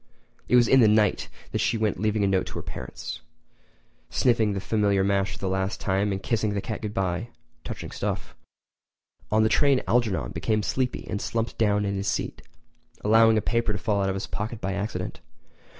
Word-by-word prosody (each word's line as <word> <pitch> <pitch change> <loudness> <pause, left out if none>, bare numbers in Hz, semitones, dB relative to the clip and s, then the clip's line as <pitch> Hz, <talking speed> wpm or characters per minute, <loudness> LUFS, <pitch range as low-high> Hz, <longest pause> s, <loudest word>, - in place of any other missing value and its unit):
It - - +3
was 120 -2 +6
in 135 - +6
the 115 - +7
night 105 0 +2 0.2
that - - -1
she 115 - +1
went 110 -4 0
leaving 105 0 +1
a - - +3
note 95 -1 +1
for - - -10
her - - -3
parents, 65 - -7 0.9
sniffing 115 -5 +2
the 100 - -2
familiar 100 0 +1
mash 100 0 +1
for - - -8
the 95 - -3
last 95 +1 -1
time, 100 +1 0
and 95 -1 -3
kissing 110 -3 0
the - - 0
cat 110 +1 -5
goodbye—touching 105 +4 -5
stuff! - - -4 1.0
On 110 +1 +4
the - - +4
train 140 +3 +3
Algernon 115 -5 +1
became 110 -2 0
sleepy 130 +2 -1
and 100 - -3
slumped 115 0 -2
down 105 -2 +2
in 100 0 -1
his 100 - -3
seat, - - -2 0.6
allowing 110 +1 +5
a - - +2
paper 115 -2 +1
to - - -2
fall 100 -1 0
out 95 - +1
of 95 - -1
his 95 - -3
pocket 110 +2 -4
by 95 - -2
accident. 100 +2 -4
105 Hz, 195 wpm, -26 LUFS, 100-115 Hz, 1.0 s, the